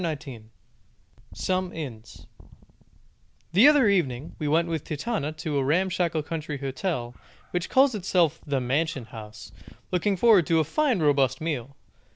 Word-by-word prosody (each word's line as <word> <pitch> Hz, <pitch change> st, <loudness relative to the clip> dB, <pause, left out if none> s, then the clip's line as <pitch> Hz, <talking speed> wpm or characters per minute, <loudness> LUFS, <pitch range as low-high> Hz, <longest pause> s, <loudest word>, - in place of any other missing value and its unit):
SOME 185 Hz, -1 st, -1 dB
INNS 125 Hz, -8 st, -8 dB, 1.3 s
The 210 Hz, +10 st, +7 dB
other 290 Hz, -6 st, +5 dB
evening 155 Hz, -9 st, 0 dB
we 150 Hz, -, -2 dB
went 165 Hz, +3 st, +2 dB
with 160 Hz, -3 st, -3 dB
Titania 155 Hz, 0 st, -3 dB
to 155 Hz, -2 st, -2 dB
a -, -, +1 dB
ramshackle 170 Hz, +1 st, 0 dB
country 155 Hz, -2 st, -5 dB
hotel 135 Hz, -2 st, -3 dB, 0.4 s
which 180 Hz, 0 st, -2 dB
calls 265 Hz, 0 st, +4 dB
itself 180 Hz, -6 st, +1 dB
The 140 Hz, -2 st, -1 dB
Mansion 135 Hz, +1 st, -1 dB
House, 110 Hz, -1 st, -11 dB, 0.4 s
looking 185 Hz, +2 st, +1 dB
forward 205 Hz, -6 st, +5 dB
to 165 Hz, -1 st, +3 dB
a -, -, +3 dB
fine 250 Hz, -, 0 dB
robust 135 Hz, -3 st, +2 dB
meal. 140 Hz, -5 st, -4 dB
160 Hz, 135 wpm, -26 LUFS, 140-185 Hz, 1.3 s, The